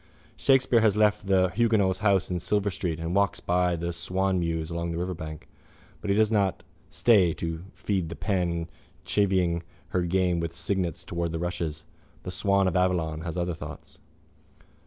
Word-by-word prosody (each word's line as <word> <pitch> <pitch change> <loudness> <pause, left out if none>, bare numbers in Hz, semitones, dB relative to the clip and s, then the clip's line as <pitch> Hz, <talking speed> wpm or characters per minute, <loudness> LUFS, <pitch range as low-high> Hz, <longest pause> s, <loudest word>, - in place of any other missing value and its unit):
—Shakespeare 130 -3 +4
has 105 -2 +3
left 105 -1 +2
the 95 -1 +4
huguenot's 100 -2 +2
house 100 -4 +2
in 90 - -1
Silver 100 +3 0
street 85 -2 -3
and 85 +1 -3
walks 100 -1 +2
by 90 0 +1
the 85 +1 -3
swanmews 85 -2 -1
along 85 0 -2
the 85 - -3
riverbank. 85 -4 -5 0.5
But 105 - -4
he 100 - +3
does 110 0 +3
not 100 -4 +1 0.3
stay 95 -8 +4
to 80 +1 -4
feed 95 -5 -1
the 85 - -6
pen 85 -1 -1 0.4
chivying 95 -4 +1 0.3
her 90 - 0
game 90 -1 +1
of 85 0 -3
cygnets 90 -3 -2
towards 85 -1 -3
the - - -1
rushes. 85 -3 -3 0.4
The - - -5
swan 100 -1 +2
of 90 - -1
Avon 85 -4 +1
has 80 +1 -5
other 90 0 -1
thoughts. 75 -2 -10
90 Hz, 165 wpm, -27 LUFS, 85-100 Hz, 0.5 s, Shakespeare